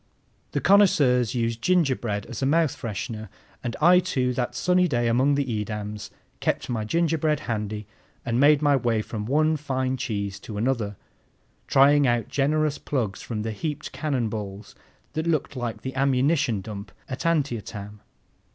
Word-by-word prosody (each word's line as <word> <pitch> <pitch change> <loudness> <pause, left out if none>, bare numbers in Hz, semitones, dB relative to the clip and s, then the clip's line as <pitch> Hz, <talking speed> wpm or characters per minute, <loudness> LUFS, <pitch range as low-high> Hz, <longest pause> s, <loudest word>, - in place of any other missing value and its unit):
The - - 0
connoisseurs 140 - +4
use 115 -1 0
gingerbread 120 - +1
as - - -7
a 135 - +2
mouth 160 0 +2
freshener; 110 -1 -5 0.3
and 120 - -3
I, 175 +3 +6
too, 130 -9 0
that 120 -1 -2
sunny 180 +6 +3
day 120 -6 0
among 130 +5 +3
the 140 0 0
Edams, 105 -2 -4 0.3
kept - - -1
my 110 -2 -1
gingerbread 160 +2 +1
handy 105 -2 -3 0.4
and 120 -1 0
made 145 +1 +5
my 145 -1 +5
way 115 -4 +1
from 105 -1 -5
one 155 +4 +2
fine 130 -2 -1
cheese 100 -6 -3
to 105 +1 -8
another, 110 -3 -1 0.7
trying 140 +1 +5
out 120 -1 +1
generous 150 +1 +1
plugs 115 -8 -2
from 110 -3 -4
the 110 - -2
heaped 150 +7 -4
cannon 135 -7 -1
balls 105 -1 -6 0.4
that 160 +2 -2
looked 155 -4 0
like 120 -3 -4
the 130 - -4
ammunition 135 -3 +2
dump 100 -1 -8 0.2
at 130 - -5
Antietam. 110 -10 -2
125 Hz, 155 wpm, -25 LUFS, 110-145 Hz, 0.7 s, I